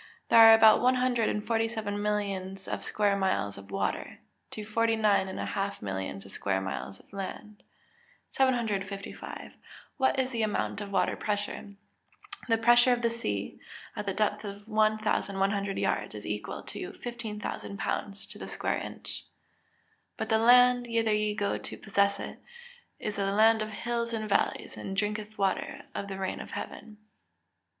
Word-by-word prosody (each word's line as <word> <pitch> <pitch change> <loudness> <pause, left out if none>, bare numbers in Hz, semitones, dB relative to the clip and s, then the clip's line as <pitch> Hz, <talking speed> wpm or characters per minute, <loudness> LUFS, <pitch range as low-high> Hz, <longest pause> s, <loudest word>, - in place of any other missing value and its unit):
_ - - -19 0.3
There - - +7
are 225 0 +11
about 220 -1 +7
one 255 +1 +4
hundred 250 -3 +2
and 210 - -2
forty 225 -1 +1
seven 210 -3 -3
millions 195 -2 -2
of - - -3
square 205 -1 +1
miles 190 - 0
of 100 0 -11
water, - - -2 0.3
to 215 - -6
forty 225 +1 +2
nine 210 -3 +3
and 190 - -5
a - - -2
half 200 0 -2
millions 95 0 -4
of 100 - -12
square 95 -1 -1
miles 95 0 -5
of - - -23
land. 205 +2 -7 0.7
755. 210 -7 -2 0.4
What 265 -1 +2
is 260 0 0
the 230 -2 -1
amount 210 -1 -1
of 200 -1 -6
water - - +2
pressure? 205 -1 -3 0.7
The 225 - +4
pressure 240 +2 +6
of 240 0 -2
the 235 - +3
sea, 105 - -3 0.4
at 210 - -5
the 195 - 0
depth 210 0 0
of 205 0 -8
1,100 205 -2 +1
yards, - - -1
is - - -8
equal - - -4
to - - -7
15,000 220 -4 -6
lbs. 200 0 -3
to - - -9
the - - -6
square - - -1
inch. - - -8
[Verse: - - -5 1.0
"But - - -3
the 220 - +4
land, 245 +1 +6
whither 225 -2 +2
ye 210 0 +1
go 205 -1 -1
to - - -7
possess 200 -1 +1
it, - - -7 0.6
is 210 -1 -4
a 200 - +1
land 220 +2 +5
of 215 - -2
hills 235 +2 -2
and 215 -1 -2
valleys, 200 - 0
and 195 0 -5
drinketh 210 +1 -2
water 195 -2 -1
of 200 - -4
the 195 -1 -5
rain 190 -1 -3
of - - -8
heaven." 215 -1 -8
210 Hz, 175 wpm, -29 LUFS, 200-225 Hz, 1.0 s, are